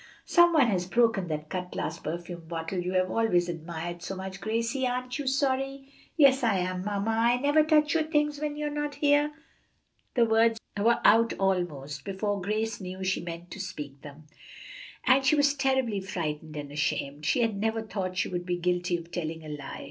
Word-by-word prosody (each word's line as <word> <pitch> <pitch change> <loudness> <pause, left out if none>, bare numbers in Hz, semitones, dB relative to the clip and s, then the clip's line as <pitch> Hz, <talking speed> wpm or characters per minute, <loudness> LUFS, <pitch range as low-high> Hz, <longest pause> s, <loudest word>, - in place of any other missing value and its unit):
"Some 345 0 +6
one 295 -5 +6
has 185 -6 0
broken 225 -3 +2
that 155 -1 -4
cut 180 0 -4
glass 160 +2 -3
perfume 170 +1 -6
bottle 165 +2 -3
you 180 +1 -2
have 185 0 +1
always 180 -6 +2
admired 170 +1 -5
so 190 +2 -5
much, 190 0 -7
Gracie. 230 +4 0
Aren't 250 +1 -3
you 285 - -4
sorry?" 270 0 -1 0.2
"Yes, 275 -3 +6
I 220 -5 +3
am, 185 0 -2
mamma. 205 +2 -1
I 230 +2 +3
never 290 +4 +4
touch 300 -1 +3
your 325 - +3
things 295 -2 0
when 295 -1 -2
you're 300 0 -2
not 295 -1 -3
here." 290 +1 +3 0.8
The 240 -2 +5
words 225 0 +3 0.2
were 225 +4 +2
out 230 +1 +6
almost 155 -7 -1
before 200 +2 -2
Grace 215 +3 -2
knew 185 +1 -6
she 185 0 0
meant 170 0 -7
to - - -7
speak 150 -8 -6
them, 145 +1 -12 0.8
and 265 +1 +5
she 275 +3 +4
was 285 -1 +4
terribly 265 -7 +1
frightened 160 -5 -4
and 145 -1 -6
ashamed. 145 0 -2
She 245 - +2
had 225 -3 0
never 220 +2 -1
thought 185 -4 -4
she - - +1
would 175 -1 -3
be 175 0 0
guilty 180 0 0
of 170 0 -11
telling 160 -2 -4
a - - -7
lie. 145 -2 -6
195 Hz, 195 wpm, -28 LUFS, 175-260 Hz, 0.8 s, Some